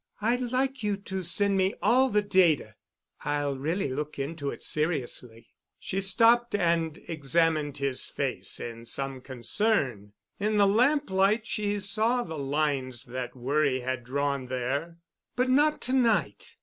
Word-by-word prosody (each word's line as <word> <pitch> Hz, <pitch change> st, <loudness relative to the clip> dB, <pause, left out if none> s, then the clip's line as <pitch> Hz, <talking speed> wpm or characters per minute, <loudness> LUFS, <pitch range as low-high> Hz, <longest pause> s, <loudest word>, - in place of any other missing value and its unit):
I'd 235 Hz, +4 st, 0 dB
like 260 Hz, +2 st, -1 dB
you 205 Hz, -2 st, -1 dB
to 190 Hz, -1 st, -5 dB
send 195 Hz, +3 st, +2 dB
me 190 Hz, +2 st, +1 dB
all 260 Hz, +2 st, +3 dB
the 210 Hz, -2 st, +1 dB
data. 175 Hz, -, +2 dB, 0.5 s
I'll 145 Hz, -1 st, -1 dB
really 160 Hz, +5 st, -2 dB
look 150 Hz, +3 st, -4 dB
into 140 Hz, +1 st, -4 dB
it -, -, -7 dB
seriously." 130 Hz, -7 st, -1 dB, 0.3 s
She 195 Hz, +1 st, -3 dB
stopped 230 Hz, +4 st, +4 dB
and 170 Hz, -4 st, 0 dB
examined 155 Hz, -1 st, +1 dB
his 140 Hz, -2 st, +2 dB
face -, -, -2 dB
in 115 Hz, 0 st, -7 dB
some 135 Hz, 0 st, -2 dB
concern. 125 Hz, -, -1 dB, 0.3 s
In 210 Hz, +1 st, 0 dB
the 200 Hz, -, +5 dB
lamplight 215 Hz, -2 st, +2 dB
she 205 Hz, -2 st, -1 dB
saw 220 Hz, +5 st, +1 dB
the 160 Hz, -5 st, -7 dB
lines 135 Hz, -3 st, -1 dB
that 125 Hz, 0 st, -6 dB
worry 135 Hz, +1 st, 0 dB
had 130 Hz, -1 st, -3 dB
drawn 140 Hz, +1 st, -2 dB
there. 135 Hz, +7 st, -3 dB, 0.4 s
"But 250 Hz, +1 st, +1 dB
not 295 Hz, +4 st, +3 dB
to 255 Hz, -, -2 dB
night. 220 Hz, -, +1 dB
165 Hz, 145 wpm, -27 LUFS, 135-210 Hz, 0.5 s, the